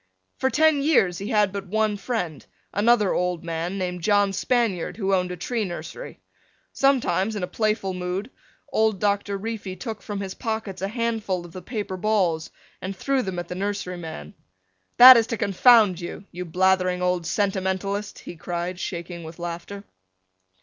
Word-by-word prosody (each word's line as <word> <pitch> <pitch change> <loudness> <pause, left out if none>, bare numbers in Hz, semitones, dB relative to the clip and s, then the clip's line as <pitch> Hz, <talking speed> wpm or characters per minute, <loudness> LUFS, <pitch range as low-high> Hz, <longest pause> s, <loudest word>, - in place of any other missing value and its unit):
For 265 - +2
ten 310 0 +3
years 255 - +3
he 200 - -5
had 210 -4 +2
but 200 -1 -5
one 215 +2 +1
friend, 195 - -3 0.3
another 210 -1 +3
old 180 -1 -1
man 170 +3 -3
named 180 -2 -3
John 205 +1 +3
Spaniard 225 -6 0
who 195 -3 0
owned 180 -1 +1
a 180 - -5
tree 230 +6 -2
nursery. 195 - -7 0.5
Sometimes, 220 -7 +2
in 200 - -3
a - - -1
playful 215 -3 -1
mood, 180 +6 -4 0.4
old 220 -3 +2
Doctor 200 0 0
Reefy 210 -2 -5
took 220 +2 -6
from 205 -1 -5
his 195 -1 -4
pockets 220 -5 -4
a 195 - 0
handful 220 -5 -2
of 175 - -12
the 185 - -8
paper 205 -1 -4
balls 185 -6 +1 0.3
and 190 +1 -4
threw 270 +6 0
them 190 -5 -4
at 175 -1 -4
the - - -5
nursery 195 -1 -3
man. 160 - -8 0.6
"That 255 0 +12
is 230 -1 +2
to 230 - -3
confound 200 -2 +5
you, 175 +3 -7
you 180 +1 -6
blathering 185 +1 +2
old 180 -2 0
sentimentalist," 195 0 -1
he - - -9
cried, 175 +2 -4
shaking 170 -1 -5
with 160 +1 -9
laughter. 175 +3 -6
195 Hz, 170 wpm, -24 LUFS, 180-220 Hz, 0.6 s, That